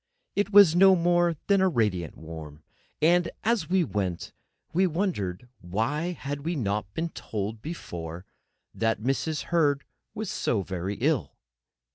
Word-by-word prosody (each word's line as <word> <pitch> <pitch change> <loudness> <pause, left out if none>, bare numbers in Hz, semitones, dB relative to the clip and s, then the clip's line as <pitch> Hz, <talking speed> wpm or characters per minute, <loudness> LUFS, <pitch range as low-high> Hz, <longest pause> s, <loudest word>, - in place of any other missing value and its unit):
It 205 0 0
was 200 -5 +8
no 190 +1 +7
more 175 -1 +2
than 200 -1 +3
radiant 105 - +1
warm. 80 -2 -9 0.4
And, 175 +1 +4
as 230 -3 +1
we 185 -1 +3
went, 95 - -3 0.4
we 185 +3 +3
wondered 140 - -2
why 115 - -1 0.3
we 165 +4 -2
had - - -3
not 100 -4 -2
been 165 +1 -1
told 105 -5 -5
before 85 - -6 0.5
that 115 -1 0
Mrs. 135 +6 -1
Herd 145 -4 +3 0.3
was 215 -2 -3
so 105 -5 0
very 95 +2 -3
ill. 125 - 0
140 Hz, 135 wpm, -27 LUFS, -, 0.5 s, was